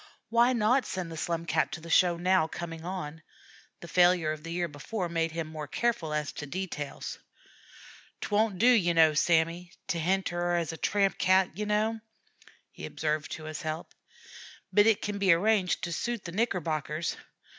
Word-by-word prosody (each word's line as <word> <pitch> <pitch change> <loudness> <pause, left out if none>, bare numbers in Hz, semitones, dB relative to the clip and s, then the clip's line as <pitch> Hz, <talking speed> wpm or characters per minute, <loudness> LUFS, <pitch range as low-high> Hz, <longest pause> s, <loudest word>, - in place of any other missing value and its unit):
Why 235 +2 +4
not 245 +3 +2
send 180 -3 -4
the - - -6
Slum 165 +1 -2
Cat 155 -1 +1
to - - -4
the 165 +1 -9
show 175 -1 +4
now 180 -1 +2
coming 165 -1 -7
on? 165 -4 -5 0.6
The 170 - -9
failure 175 -3 +4
of 155 -1 -5
the 165 +1 -7
year 175 0 -1
before 175 +6 -4
made 165 -1 0
him 165 0 -3
more 155 -1 -7
careful 235 -10 -1
as 150 -1 -1
to 150 - -7
details. 160 -4 -5 1.0
"'T - - -5
won't 210 -1 +2
do, 215 - +2
ye 210 -9 +5
kneow, 160 -2 +5
Sammy, 170 +2 +1 0.2
to 170 - 0
henter 175 0 0
'er 175 0 +1
as 170 -2 -1
a - - -7
tramp 200 +1 +1
Cat, 185 -2 +3
ye 210 +2 -3
kneow," 215 +2 0 0.7
he - - -8
observed 155 -1 -2
to 155 - -7
his 155 -1 -6
help; 155 +1 -5 0.8
"but 205 +1 +6
it 220 -2 +3
kin 205 -1 -3
be 195 -2 +4
arranged 190 +1 +1
to 170 - -2
suit 235 +5 -3
the 170 - -5
Knickerbockers. 165 -6 -1
175 Hz, 185 wpm, -29 LUFS, 160-195 Hz, 1.0 s, but